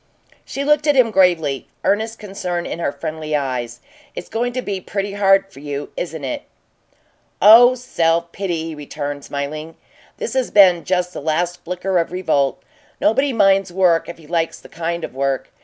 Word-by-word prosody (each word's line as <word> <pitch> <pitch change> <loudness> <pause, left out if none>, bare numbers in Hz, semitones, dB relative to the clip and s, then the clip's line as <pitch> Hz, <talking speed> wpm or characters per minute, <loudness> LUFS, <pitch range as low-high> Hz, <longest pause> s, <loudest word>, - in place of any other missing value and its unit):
She 275 - -4
looked 300 +1 +2
at 295 - +4
him 250 -4 +4
gravely, 170 -8 +2 0.2
earnest 220 +2 0
concern 185 -4 -4
in - - -5
her 170 - -1
friendly 155 -1 -4
eyes. 125 -4 -3 0.3
"It's - - -7
going 240 +2 -1
to 255 0 -3
be 195 -2 -3
pretty 200 +1 -3
hard 195 -1 +3
for - - -12
you, 145 0 -5
isn't 160 -4 -5
it?" 130 - -3 1.0
"Oh 235 +5 +8
self 170 -8 0
pity!" 175 -4 -3
he - - -6
returned, 145 -1 -6
smiling. 150 +3 -5 0.4
"This 470 - -4
has 260 -2 0
been 185 -4 +5
just 180 -1 0
the - - -6
last 175 +4 -1
flicker 180 +1 -1
of 165 - -2
revolt. 155 -7 0 0.4
Nobody 270 +5 +2
minds 195 -4 +3
work 175 -3 +2
if 170 - -8
he 165 - -16
likes 165 +1 -1
the - - -15
kind 170 0 -4
of - - -6
work. 135 0 -2
175 Hz, 175 wpm, -20 LUFS, 155-200 Hz, 1.0 s, Oh